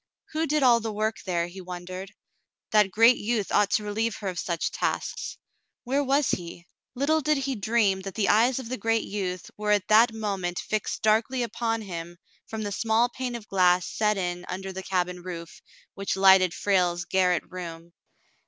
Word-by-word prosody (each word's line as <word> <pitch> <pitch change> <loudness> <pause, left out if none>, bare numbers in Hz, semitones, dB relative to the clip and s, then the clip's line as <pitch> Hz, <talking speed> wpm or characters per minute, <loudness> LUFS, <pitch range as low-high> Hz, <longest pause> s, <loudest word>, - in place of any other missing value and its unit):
Who 320 +1 -1
did 300 0 +1
all 240 -2 +6
the 225 -1 -4
work 215 +1 -1
there, 170 -2 0
he 180 +2 -9
wondered. 185 +2 -7 0.6
That 210 -2 +4
great 230 +6 +5
youth 215 -2 -1
ought 205 -1 +3
to 215 - +2
relieve 220 +2 -1
her 200 - -4
of 180 -2 -5
such 170 -3 -2
tasks. - - -3 0.5
Where 275 +3 0
was 275 +1 +2
he? 170 0 -5 0.3
Little 305 +5 +2
did 305 0 +2
he 275 0 -2
dream 210 -3 +1
that 195 0 -7
the 210 -3 +1
eyes 235 +4 +4
of 260 -3 -5
the 255 0 -4
great 225 +1 +1
youth 185 -3 -4
were 210 0 -3
at 205 -1 +2
that 225 +2 +6
moment 195 -5 -3
fixed 215 +1 -3
darkly 225 +4 +2
upon 225 0 -2
him 175 -2 -7 0.3
from 220 -1 -5
the 205 - -3
small 225 +3 +2
pane 250 -1 -4
of 220 -3 -8
glass 180 -2 +3
set 210 -1 0
in 175 -1 -3
under 190 +1 -5
the 190 - -5
cabin 180 -1 -2
roof, 170 -2 -8 0.3
which 195 0 -2
lighted 190 -2 +5
Frale's 180 -3 +1
garret 180 -2 +2
room. 170 -2 -8
205 Hz, 185 wpm, -26 LUFS, 180-230 Hz, 0.6 s, all